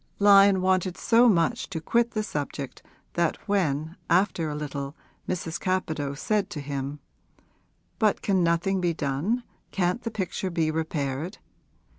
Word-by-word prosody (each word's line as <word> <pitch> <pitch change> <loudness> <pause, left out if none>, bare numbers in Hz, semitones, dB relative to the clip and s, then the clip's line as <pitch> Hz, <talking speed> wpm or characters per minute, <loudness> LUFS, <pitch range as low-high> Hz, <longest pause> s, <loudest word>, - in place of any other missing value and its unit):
Lyon 200 -2 +6
wanted 185 -1 +1
so 235 +1 +5
much 210 +6 +1
to 175 -5 -3
quit 235 +8 +2
the 215 -2 0
subject 145 -7 -5 0.3
that 170 -1 +1
when 160 -5 0
after 175 -2 +2
a 150 - -4
little 140 -1 -5 0.3
Mrs. 170 -2 -2
Capadose 155 -6 -2
said 210 -2 0
to 165 - -5
him, 140 0 -4 1.0
'But 215 -3 +2
can 190 -3 +2
nothing 170 +3 +1
be 170 -2 +1
done, 155 - -1 0.3
can't 180 +4 0
the 230 - -3
picture 190 -3 -3
be 165 -3 0
repaired? 155 +1 -2
175 Hz, 140 wpm, -26 LUFS, 150-195 Hz, 1.0 s, Lyon